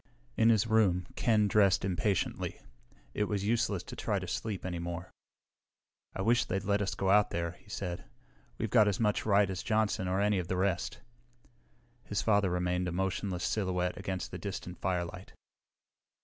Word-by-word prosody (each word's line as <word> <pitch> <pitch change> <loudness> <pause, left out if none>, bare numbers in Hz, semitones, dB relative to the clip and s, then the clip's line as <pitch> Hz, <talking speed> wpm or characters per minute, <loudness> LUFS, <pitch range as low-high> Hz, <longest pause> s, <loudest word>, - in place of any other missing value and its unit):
In 115 - +4
his 110 -2 +4
room, 105 -6 +3
Ken 110 -3 +3
dressed 100 -2 +3
impatiently. 95 0 -1 0.5
It 105 - 0
was 100 -1 -2
useless 110 -4 +1
to - - -9
try - - -1
to - - -4
sleep 105 -5 -3
any 90 -2 -3
more. 85 +1 -5 1.0
"I 95 - -2
wish 115 +3 +4
they'd 95 +1 -2
let 100 +1 +1
us 100 - -1
go 95 -1 +1
out 105 0 +5
there," 85 -1 -2
he 90 - -19
said. 90 -3 -4 0.5
"We've 110 - -3
got 110 -3 +6
as 100 - 0
much 105 -1 +1
right 100 -1 +5
as 95 -1 -4
Johnson 110 -4 0
or 95 +1 0
any 105 -1 +2
of 90 - -4
the 95 - -1
rest." 95 -2 -1 1.0
His - - -2
father 100 -3 +3
remained 90 0 0
a - - -2
motionless 95 0 -2
silhouette 90 -3 0
against 95 -2 -4
the - - -6
distant 95 -3 -6
firelight. 90 0 -3
95 Hz, 175 wpm, -31 LUFS, 90-105 Hz, 1.0 s, got